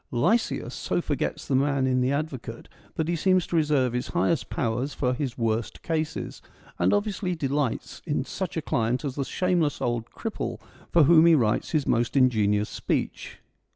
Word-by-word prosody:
Lysias 215 Hz, -, +1 dB
so -, -, -1 dB
forgets -, -, -2 dB
the 140 Hz, -, -1 dB
man 140 Hz, 0 st, +2 dB
in 130 Hz, -1 st, +2 dB
the 125 Hz, +1 st, +1 dB
advocate 140 Hz, -6 st, -4 dB, 0.3 s
that 160 Hz, -, -1 dB
he 170 Hz, -, 0 dB
seems 185 Hz, +2 st, +2 dB
to -, -, -4 dB
reserve 145 Hz, -6 st, +2 dB
his 125 Hz, +1 st, -2 dB
highest 170 Hz, -2 st, 0 dB
powers 125 Hz, +3 st, -2 dB
for 125 Hz, -2 st, 0 dB
his 130 Hz, -2 st, -3 dB
worst 115 Hz, -1 st, -2 dB
cases, 160 Hz, -1 st, -3 dB, 0.4 s
and -, -, +3 dB
obviously 205 Hz, -3 st, 0 dB
delights 140 Hz, -4 st, -2 dB
in 145 Hz, -3 st, 0 dB
such 185 Hz, +1 st, -4 dB
a 160 Hz, -, -2 dB
client 125 Hz, +2 st, 0 dB
as 135 Hz, -, -2 dB
the 140 Hz, -, -2 dB
shameless 170 Hz, 0 st, 0 dB
old 120 Hz, -1 st, -2 dB
cripple 120 Hz, -, -4 dB, 0.3 s
for 170 Hz, -, +6 dB
whom 165 Hz, +2 st, +7 dB
he 165 Hz, -, +7 dB
writes 115 Hz, -6 st, +1 dB
his 155 Hz, -4 st, 0 dB
most 120 Hz, +4 st, +1 dB
ingenious 105 Hz, -5 st, +3 dB
speech. -, -, -3 dB
140 Hz, 175 wpm, -26 LUFS, 120-160 Hz, 0.4 s, whom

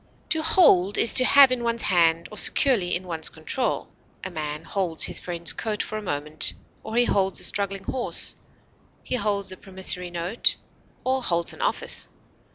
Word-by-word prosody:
To 320 Hz, -3 st, 0 dB
hold 205 Hz, -, +3 dB
is 230 Hz, -, +6 dB
to 255 Hz, -, +6 dB
have 275 Hz, 0 st, +6 dB
in 250 Hz, -2 st, -2 dB
one's 235 Hz, 0 st, -1 dB
hand, 170 Hz, -2 st, +1 dB
or 210 Hz, -, -9 dB
securely 210 Hz, -10 st, +3 dB
in 185 Hz, -, -5 dB
one's 165 Hz, -3 st, 0 dB
control; 160 Hz, +11 st, -2 dB, 0.4 s
a 185 Hz, -, -6 dB
man 150 Hz, -1 st, -6 dB
holds 175 Hz, -2 st, -3 dB
his -, -, +2 dB
friend's 170 Hz, -1 st, 0 dB
coat 215 Hz, -2 st, -3 dB
for 215 Hz, -, -7 dB
a 215 Hz, -, -4 dB
moment, 150 Hz, -4 st, 0 dB, 0.3 s
or 220 Hz, -, -7 dB
he 240 Hz, 0 st, +4 dB
holds 195 Hz, -4 st, 0 dB
a -, -, -3 dB
struggling 195 Hz, -1 st, 0 dB
horse; 245 Hz, +4 st, -4 dB, 0.7 s
he -, -, -5 dB
holds 205 Hz, -5 st, -1 dB
a 185 Hz, -, -8 dB
promissory 185 Hz, -2 st, -1 dB
note, 175 Hz, +6 st, 0 dB, 0.5 s
or 260 Hz, +1 st, -1 dB
holds 170 Hz, -7 st, -1 dB
an -, -, -11 dB
office. -, -, 0 dB
195 Hz, 175 wpm, -23 LUFS, 170-235 Hz, 0.7 s, is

